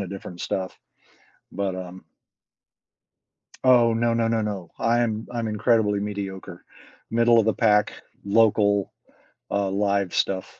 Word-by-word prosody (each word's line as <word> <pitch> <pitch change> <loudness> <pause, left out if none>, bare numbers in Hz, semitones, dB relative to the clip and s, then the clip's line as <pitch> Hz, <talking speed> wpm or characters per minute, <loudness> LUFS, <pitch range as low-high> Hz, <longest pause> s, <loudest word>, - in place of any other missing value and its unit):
of 100 - -4
different 95 -2 -9
stuff. 95 +1 -4 0.7
But, 100 -2 -3
um 95 0 -8 1.6
Oh, 120 -3 +5
no, 115 +1 +1
no, 115 -1 +1
no, 115 -1 0
no, 100 -5 -5
I'm 115 -2 0
I'm 115 -2 -2
incredibly 105 -1 +1
mediocre, 100 -3 -6 0.5
middle 115 0 +4
of 110 - +2
the 110 - +2
pack, 105 -2 +2 0.3
local, 100 -1 +2 0.6
uh, 100 -1 0
live 100 -1 0
stuff. 95 -1 -2
105 Hz, 125 wpm, -24 LUFS, 100-115 Hz, 1.6 s, Oh